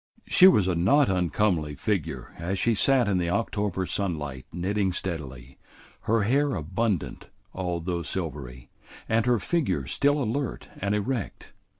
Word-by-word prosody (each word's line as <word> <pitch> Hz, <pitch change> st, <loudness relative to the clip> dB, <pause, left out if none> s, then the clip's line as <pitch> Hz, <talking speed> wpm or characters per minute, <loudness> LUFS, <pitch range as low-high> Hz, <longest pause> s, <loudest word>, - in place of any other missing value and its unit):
She 185 Hz, -, +7 dB
was 105 Hz, -, +5 dB
a 95 Hz, -, +1 dB
not 130 Hz, -, +3 dB
uncomely 90 Hz, -4 st, 0 dB
figure 95 Hz, +3 st, -3 dB
as 90 Hz, +4 st, -2 dB
she 115 Hz, +4 st, +2 dB
sat 125 Hz, +2 st, +3 dB
in 95 Hz, -3 st, +1 dB
the 85 Hz, -1 st, -1 dB
October 100 Hz, -1 st, -1 dB
sunlight 75 Hz, -10 st, -3 dB
knitting 95 Hz, +2 st, -1 dB
steadily, 70 Hz, -8 st, -6 dB, 0.5 s
her 115 Hz, -1 st, +3 dB
hair 140 Hz, +5 st, +2 dB
abundant 95 Hz, +3 st, -2 dB, 0.2 s
although 90 Hz, -1 st, -2 dB
silvery, 70 Hz, -8 st, -6 dB, 0.4 s
and 110 Hz, +2 st, +1 dB
her 120 Hz, -1 st, +4 dB
figure 100 Hz, -, -1 dB
still 145 Hz, -, +1 dB
alert 120 Hz, +3 st, -3 dB
and 100 Hz, +2 st, -1 dB
erect. 110 Hz, +1 st, -3 dB
95 Hz, 135 wpm, -26 LUFS, 85-115 Hz, 0.5 s, She